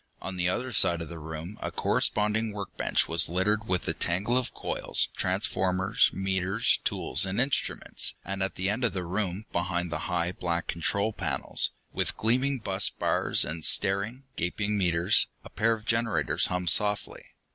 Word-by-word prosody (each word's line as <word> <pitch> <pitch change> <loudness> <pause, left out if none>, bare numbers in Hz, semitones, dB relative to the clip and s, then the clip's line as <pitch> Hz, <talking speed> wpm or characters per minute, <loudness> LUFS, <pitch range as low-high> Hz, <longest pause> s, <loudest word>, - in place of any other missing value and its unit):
On 95 - -6
the 90 0 +1
other 125 +6 -2
side 85 -5 +3
of 80 - -10
the 85 - -8
room 80 +5 -7
a - - -2
corresponding 105 +1 +1
workbench 100 -2 0
was 80 -1 +2
littered 105 +5 0
with 90 -1 -1
a - - +1
tangle 100 +8 0
of 125 -1 0
coils, - - 0
transformers, 95 0 +2
meters, 95 +3 0
tools - - -1
and 95 +2 -1
instruments, 135 +3 0
and 95 +1 -4
at 95 - -1
the 95 - -1
end 110 +5 -1
of 120 - +1
the 95 -2 -3
room, 95 +3 -3
behind 85 -1 -1
high 85 +2 -1
black 85 -1 -2
control 100 +6 -1
panels, - - 0 0.2
with - - -1
gleaming 130 +5 +1
bus 95 -4 +1
bars - - +1
and 80 0 -5
staring, 100 - +2
gaping 100 +5 -1
meters, 90 -3 +3 0.2
a - - -11
pair 115 +1 +2
of 110 -1 -7
generators 115 0 +1
hummed 90 -1 +1
softly. 105 -1 +1
95 Hz, 165 wpm, -28 LUFS, 90-105 Hz, 0.2 s, side